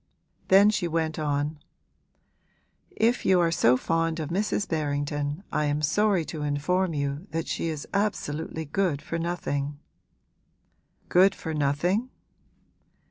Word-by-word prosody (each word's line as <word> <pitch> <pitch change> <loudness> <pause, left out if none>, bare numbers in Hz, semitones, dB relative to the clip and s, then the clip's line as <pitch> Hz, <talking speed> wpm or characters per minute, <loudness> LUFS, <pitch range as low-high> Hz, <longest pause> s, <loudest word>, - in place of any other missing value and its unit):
Then 200 +2 +7
she 180 -4 -1
went 160 -1 -1
on, 145 0 -1 1.3
'If 230 +2 +1
you 185 -1 +4
are 170 -1 +3
so 125 -6 +4
fond 165 +3 0
of 155 -2 -3
Mrs. 205 +2 0
Berrington 145 0 -2
I 150 -1 +1
am 145 +1 -1
sorry 190 +2 +2
to 155 -1 -6
inform 160 +5 0
you 140 +5 -3
that 165 0 -3
she - - -2
is 155 -3 -4
absolutely 160 -6 -2
good 165 -1 0
for 165 +2 -4
nothing.' 145 -4 -2 1.3
'Good 190 +2 +5
for 160 - -5
nothing?' 155 - 0
160 Hz, 130 wpm, -26 LUFS, 145-185 Hz, 1.3 s, Then